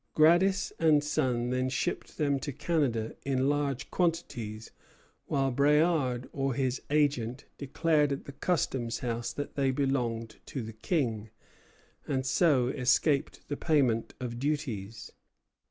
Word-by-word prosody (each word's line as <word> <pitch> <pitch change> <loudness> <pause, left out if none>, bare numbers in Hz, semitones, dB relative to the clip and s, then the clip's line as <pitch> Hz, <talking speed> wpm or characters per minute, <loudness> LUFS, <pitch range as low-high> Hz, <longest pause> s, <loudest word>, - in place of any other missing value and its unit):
Gradis 175 +5 +4
and 155 -3 +4
Son 125 -5 0
then 130 0 0
shipped 130 - -3
them 140 -2 +1
to 145 - -4
Canada 130 -7 -1
in 135 -1 +1
large 140 -3 -1
quantities, 120 - -2 0.6
while 135 -2 +1
Bréard 140 -3 +2
or 135 -2 -1
his 130 -1 -1
agent 140 -4 +1
declared 150 +1 +1
at 140 - -3
the - - -7
custom 135 -5 -1
house 115 0 -3
that 145 - -5
they 135 -1 +1
belonged 125 -5 -1
to 130 - -4
the 110 0 -7
King, 110 - -1 0.8
and 130 -2 -1
so 130 -2 +3
escaped 140 +2 +1
the 145 - -2
payment 135 -8 +1
of 120 -2 -5
duties. 120 -8 -3
135 Hz, 130 wpm, -29 LUFS, 120-150 Hz, 0.8 s, Gradis